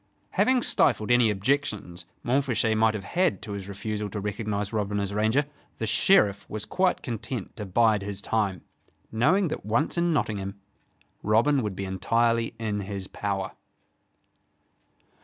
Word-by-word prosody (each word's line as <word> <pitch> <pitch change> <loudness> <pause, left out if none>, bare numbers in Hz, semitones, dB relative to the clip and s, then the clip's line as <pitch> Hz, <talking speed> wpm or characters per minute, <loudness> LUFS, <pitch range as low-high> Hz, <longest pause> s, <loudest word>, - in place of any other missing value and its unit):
Having 255 -2 +3
stifled 110 +2 +3
any 120 -2 +5
objections 105 -5 -1 0.2
Montfichet 120 -3 +1
might 110 0 +3
have 100 - -4
had 180 - +1
to 110 - -6
his 100 -1 -5
refusal 105 +1 -4
to 105 - -4
recognize 105 0 -3
Robin 105 -1 -1
as 100 0 -2
Ranger, 110 +7 +2 0.3
the 110 - -2
Sheriff 105 - +3
was 110 -1 -4
quite 185 0 +1
content 115 -2 -5
to 105 -3 -5
bide 110 +1 +3
his 100 -1 -5
time, 100 -5 -1 0.5
knowing 160 - +3
that - - -5
once 115 +11 0
in 170 0 +2
Nottingham, 100 -9 -2 0.6
Robin 120 +7 +3
would 105 -4 -3
be 100 - -4
entirely 115 +4 +1
in 110 -2 -2
his 100 -1 -5
power. 100 -1 -3
110 Hz, 145 wpm, -26 LUFS, 100-120 Hz, 0.6 s, any